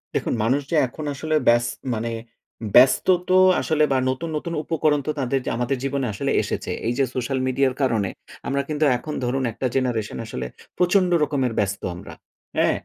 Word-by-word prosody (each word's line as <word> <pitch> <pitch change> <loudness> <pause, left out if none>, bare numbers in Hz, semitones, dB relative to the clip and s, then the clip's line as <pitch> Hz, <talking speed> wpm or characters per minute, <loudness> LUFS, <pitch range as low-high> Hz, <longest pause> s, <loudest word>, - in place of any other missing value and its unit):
দেখুন - - 0
মানুষ 130 +6 +2
যে, - - +2
এখন 150 +5 -8
আসলে 155 +3 -2
ব্যাস 120 0 +5 0.3
মানে 115 +1 -2 0.6
ব্যস্ত 130 +1 +6 0.2
তো 185 - +4 0.3
আসলে 155 -1 +1
বা 135 - +3
নতুন, 145 +6 -3
নতুন 170 +2 -5
উপকরণ 155 -2 +1
তো - - +2
তাদের 135 0 0
যে, - - -1
আমাদের 125 +2 -1
জীবনে 135 -1 -1
আসলে 100 - -2
এসেছে। - - -4 0.2
এই 120 - +1
যে, 140 - +3
সোশ্যাল 130 +1 -1
মিডিয়ার 130 0 +1
কারণে 110 -7 +1 0.4
আমরা 140 0 0
কিন্তু 155 0 +1
এখন 150 +5 -6
ধরুন 130 +2 -1
একটা 130 +4 -2
generation 120 -5 -1
আসলে 65 - -5 0.3
প্রচণ্ড 180 +1 +3
রকমের 135 -5 0
ব্যস্ত 100 0 -1
আমরা। 90 - -10 0.4
অ্যা - - +4
135 Hz, 175 wpm, -23 LUFS, 120-150 Hz, 0.6 s, ব্যস্ত